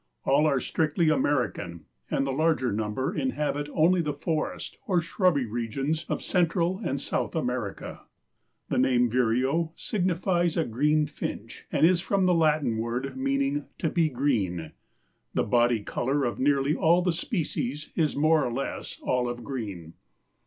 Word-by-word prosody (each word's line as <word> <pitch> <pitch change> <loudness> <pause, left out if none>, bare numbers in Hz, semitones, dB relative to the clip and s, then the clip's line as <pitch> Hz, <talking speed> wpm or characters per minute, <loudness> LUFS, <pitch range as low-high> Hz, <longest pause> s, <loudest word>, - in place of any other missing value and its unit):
All 145 +3 +4
are 140 -3 +2
strictly 160 +3 +1
American 120 - -1 0.2
and 135 - 0
the 135 - -1
larger 155 -4 +1
number 105 +5 -2
inhabit 150 - -1
only 175 +4 +3
the 150 -3 -2
forest 155 +1 -3
or 185 -4 +3
shrubby 170 -4 +1
regions 135 +8 -2
of - - -2
Central 175 +1 +1
and 135 -5 -1
South - - -2
America. 125 -9 -3 0.6
The - - +1
name 125 -2 +3
vireo 130 +7 +1
signifies 175 -3 0
a 165 - +2
green 150 +6 +2
finch 150 - -6
and - - +4
is 175 0 +4
from 195 0 +1
the 180 - +4
Latin 150 -8 +2
word 120 +4 -3
meaning 275 +2 0
"to 160 - -1
be 165 -3 +2
green." 105 - -1 0.6
The - - +2
body 120 0 +2
color 135 +6 -1
of 120 - -2
nearly 140 +1 +2
all 170 +2 +3
the 180 -2 +1
species 155 - -3
is 155 -3 +1
more 155 +1 +3
or 120 - -1
less 135 +4 -4
olive 120 -1 -1
green. 100 - -6
145 Hz, 150 wpm, -27 LUFS, 125-165 Hz, 0.6 s, All